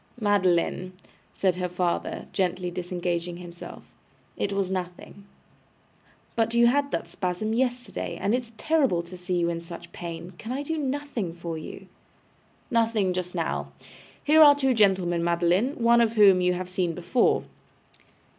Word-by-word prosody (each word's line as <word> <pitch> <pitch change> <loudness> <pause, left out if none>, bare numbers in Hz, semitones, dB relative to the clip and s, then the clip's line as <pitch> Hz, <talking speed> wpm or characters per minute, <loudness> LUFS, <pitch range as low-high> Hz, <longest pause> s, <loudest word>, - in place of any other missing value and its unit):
'Madeline,' 185 -3 +1 0.4
said 185 -2 0
her 180 -1 -2
father, 180 -1 -2
gently 180 -1 -1
disengaging 175 -1 -3
himself, 175 -1 -10 0.5
'it 200 - -2
was 195 -1 -1
nothing.' 185 +2 -6 1.1
'But 230 0 +1
you 235 0 +6
had 280 +4 +3
that - - -3
spasm 185 +3 -2
yesterday, 245 0 -2
and 205 - 0
it 250 - +2
is 235 -2 -16
terrible 270 - +2
to 170 +2 -10
see 180 0 -3
you 170 -1 +1
in 170 0 -4
such 170 0 -10
pain. 170 +1 -7
Can 225 - -6
I 280 +2 -3
do 320 +2 -3
nothing 270 - -3
for 170 -1 -5
you?' 160 +4 -8 0.9
'Nothing 225 -5 +2
just 180 0 -4
now. - - -2 0.5
Here 310 +2 +5
are 290 -2 +9
two 270 -2 +2
gentlemen, 185 -6 +2
Madeline, 175 +9 +2
one 235 0 +4
of 230 -1 +2
whom 200 -4 +6
you 180 0 +2
have 180 0 -4
seen 180 -2 -1
before. 180 +7 +2
185 Hz, 155 wpm, -26 LUFS, 175-235 Hz, 1.1 s, are